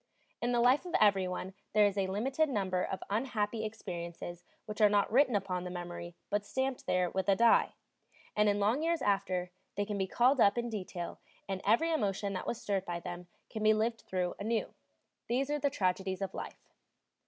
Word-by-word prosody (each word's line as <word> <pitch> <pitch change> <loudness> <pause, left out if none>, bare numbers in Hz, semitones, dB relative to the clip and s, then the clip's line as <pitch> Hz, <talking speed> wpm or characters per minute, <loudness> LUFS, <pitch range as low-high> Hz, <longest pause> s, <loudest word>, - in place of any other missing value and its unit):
In 240 - 0
the 240 - +2
life 260 +8 +4
of 350 - -2
everyone 190 -2 +2 0.2
there 210 -1 +6
is 200 -1 +1
a 195 -2 0
limited 265 +11 0
number 190 -6 0
of 190 - -4
unhappy 220 -1 -1
experiences 175 -5 -6 0.2
which 215 +1 -5
are 210 - +7
not 205 0 +2
written 255 -1 +4
upon 185 -3 -1
the 180 - -5
memory, 175 -1 -6 0.2
but 205 0 +1
stamped 265 +4 -2
there 180 -1 +1
with 190 0 -1
a 195 - +6
die; 230 +3 +4 0.6
and 210 0 +4
in 205 0 +1
long 220 +8 +2
years 335 +1 0
after, 185 -3 0 0.2
they 205 - 0
can 205 -1 -3
be 190 - 0
called 250 +7 +3
up 200 +2 +5
in 240 0 -1
detail, 185 -4 -5 0.3
and 190 -1 -3
every 280 +11 +4
emotion 200 -6 0
that 185 - -4
was 235 - -2
stirred 195 -2 -1
by 175 -2 -4
them 175 0 -7 0.2
can 220 - -6
be 215 0 +5
lived 225 +1 0
through 180 -1 -2
anew; 220 +2 -1 0.5
these 265 +4 0
are 295 - 0
the 285 - +2
tragedies 190 -5 -1
of 195 - -4
life. - - -8
205 Hz, 200 wpm, -32 LUFS, 185-235 Hz, 0.6 s, are